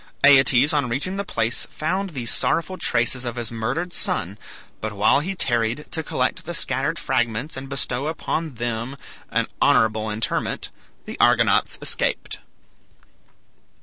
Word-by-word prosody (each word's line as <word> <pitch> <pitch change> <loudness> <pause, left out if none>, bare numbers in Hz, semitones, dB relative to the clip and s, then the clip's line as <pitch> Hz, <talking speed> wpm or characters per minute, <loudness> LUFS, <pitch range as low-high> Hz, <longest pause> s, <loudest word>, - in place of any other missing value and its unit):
Aeetes 140 0 +6
on 140 -4 +1
reaching 145 +11 -1
the 200 - -1
place 115 - -1
found 190 +5 -2
these 125 -8 -2
sorrowful 175 +3 0
traces 125 -6 +2
of 120 -1 -4
his 120 -2 -4
murdered 135 +11 -3
son; 100 +2 -2 0.4
but 110 -1 -3
while 105 +6 +3
he 185 +6 -3
tarried 120 -2 +1
to 165 - -2
collect - - -1
the - - -4
scattered - - 0
fragments 120 +5 -1
and 135 0 -7
bestow 135 0 -2
upon 160 -2 -3
them 120 +3 -3 0.3
an - - +1 0.2
honorable 110 0 +3
interment, 105 +2 -2 0.3
the - - -8
Argonauts - - +3
escaped. - - -1
125 Hz, 140 wpm, -23 LUFS, 115-155 Hz, 0.4 s, Aeetes